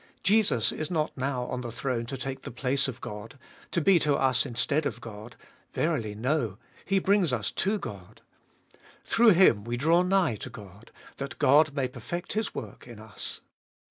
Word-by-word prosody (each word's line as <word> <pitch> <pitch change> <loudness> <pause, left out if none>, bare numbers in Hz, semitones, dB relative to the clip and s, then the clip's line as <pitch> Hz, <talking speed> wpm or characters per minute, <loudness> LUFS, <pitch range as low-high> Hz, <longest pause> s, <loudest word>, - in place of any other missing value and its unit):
Jesus 200 - +4
is 155 - -4
not 160 -3 -1
now 130 -1 -2
on 125 0 -4
the 120 -2 -5
throne 115 0 -2
to 135 - -5
take 135 +1 -5
the - - -7
place 135 +3 0
of 130 -2 -6
God, 105 +5 -8 0.3
to - - 0
be 185 +2 +5
to 150 -2 +2
us 130 -1 +2
instead 140 +5 0
of - - -5
God. 110 0 -10 0.4
Verily 125 -11 -1
no; 120 -3 -1 0.3
He 195 - +1
brings 190 -4 +3
us 110 -4 -1
to 205 +3 0
God. 100 - -9 0.8
Through 230 -2 +5
Him 165 - +5
we 120 +2 -3
draw 165 +7 +4
nigh 180 - +2
to - - -7
God, 100 +1 -13 0.3
that 140 0 -6
God 145 +2 +4
may 135 -3 0
perfect 125 - -6
His 215 0 -2
work - - -8
in 120 -3 -11
us. 110 -2 -6
130 Hz, 180 wpm, -28 LUFS, 115-165 Hz, 0.8 s, be